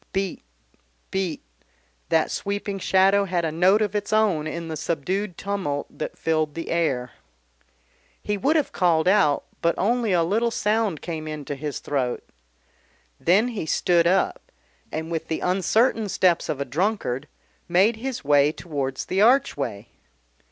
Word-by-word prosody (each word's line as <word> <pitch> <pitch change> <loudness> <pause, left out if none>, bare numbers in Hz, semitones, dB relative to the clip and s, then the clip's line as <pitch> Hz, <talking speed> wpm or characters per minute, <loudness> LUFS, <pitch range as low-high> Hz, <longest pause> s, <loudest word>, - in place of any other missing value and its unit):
"Beat, 195 -1 -2 0.7
beat," 185 -5 -2 0.7
that - - +2
sweeping 200 0 -3
shadow 195 +2 +3
had 175 -3 -1
a 160 - -1
note 185 +6 +4
of 205 -2 -2
its 205 0 -2
own 205 -8 +2
in 170 +1 -5
the 160 - -4
subdued 170 +5 -2
tumult 185 -8 -3
that - - -5
filled 155 -2 0
the 165 - -5
air. 135 -8 0 1.1
He 210 - -2
would 275 +11 +1
have 305 -3 +1
called 170 -3 +2
out, 185 -7 +3 0.2
but 170 0 +2
only 230 +2 +1
a 175 -2 +3
little 220 +7 +1
sound 210 -6 0
came 160 -2 -5
into 150 -2 -5
his 145 0 -4
throat. 130 -4 -2 0.9
Then 205 +8 +3
he 205 -9 -4
stood 170 0 +3
up, 185 +2 0 0.4
and, 160 +2 -4
with 165 -1 -3
the 160 - -3
uncertain 210 +4 +2
steps 180 -2 +2
of 140 - -2
a 140 - -1
drunkard, 150 - -1 0.4
made 195 +6 +3
his 255 -2 -4
way 145 0 +4
towards 140 -5 -4
the 190 +2 0
archway. 230 - +2
180 Hz, 150 wpm, -24 LUFS, 155-205 Hz, 1.1 s, note